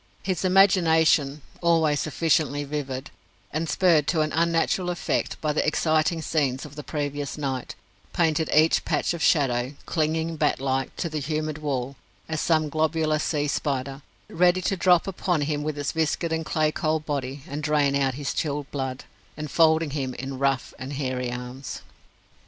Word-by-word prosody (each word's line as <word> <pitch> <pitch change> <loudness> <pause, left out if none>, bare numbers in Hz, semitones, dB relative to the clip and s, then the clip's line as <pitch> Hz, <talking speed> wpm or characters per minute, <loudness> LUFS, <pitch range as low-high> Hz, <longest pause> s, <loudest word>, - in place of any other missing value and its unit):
His 185 -2 -1
imagination 160 -6 +4 0.2
always 160 -4 +3
sufficiently 155 -2 +1
vivid, 140 -2 -4 0.4
and 160 +1 -2
spurred 165 -6 +3
to 165 -3 +2
an 155 -1 -1
unnatural 170 +2 +1
effect 175 - -2
by 150 -1 0
the - - +1
exciting 155 +1 +1
scenes 140 -4 0
of 145 -1 -11
the 150 - -6
previous 145 -1 -4
night 135 -4 -3 0.4
painted 160 -2 +1
each 155 +2 +4
patch - - 0
of 170 - -5
shadow, 130 -3 +2
clinging 160 0 -1
bat 150 -1 +1
like 135 -1 -1
to 170 - -2
the 155 -2 -3
humid 155 +1 -3
wall, 135 -3 -3 0.3
as 155 -1 -2
some 155 -2 +2
globular 155 0 +1
sea 150 -1 0
spider 135 -1 -2 0.3
ready 180 +2 +2
to 195 - +1
drop 180 -2 +4
upon 180 -4 -1
him 145 0 -1
with 150 0 -3
its 145 0 -2
viscid 160 +1 0
and 160 -1 -2
clay 155 -1 +1
cold 155 0 -1
body, 140 -2 -3
and 145 +2 -4
drain 150 -2 +2
out 135 -2 +1
his 140 -1 -3
chilled 145 -2 -2
blood, 130 -2 -4 0.3
enfolding 160 +1 +2
him 135 -3 -3
in 135 0 -6
rough 135 -3 0
and 130 +3 -6
hairy 130 -3 -2
arms. 125 +2 -7
150 Hz, 165 wpm, -25 LUFS, 140-160 Hz, 0.4 s, imagination